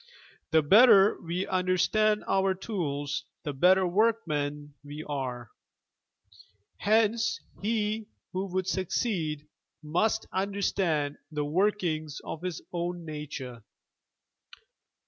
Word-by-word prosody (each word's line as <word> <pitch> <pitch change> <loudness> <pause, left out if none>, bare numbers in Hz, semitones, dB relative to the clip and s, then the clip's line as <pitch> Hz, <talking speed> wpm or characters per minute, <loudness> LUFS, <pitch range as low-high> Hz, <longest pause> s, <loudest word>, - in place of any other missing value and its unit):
The 160 -1 +4
better 205 - +6
we 175 +3 -2
understand 190 +4 +2
our 195 0 +2
tools 150 -8 -3 0.2
the 145 - -3
better 185 +7 +4
workmen 155 -8 0
we 145 +2 -7
are. 125 -5 -4 1.3
Henee 220 +2 +3 0.4
he 215 0 -1 0.3
who 190 +2 -2
would 185 0 -2
succeed 165 -6 -1 0.4
must 210 +9 +1
understand 190 -6 0
the 150 -1 -2
workings 160 -3 0
of 160 - -6
his 180 -3 -4
own 175 0 -3
nature. 140 -6 -7
175 Hz, 95 wpm, -28 LUFS, 150-200 Hz, 1.3 s, better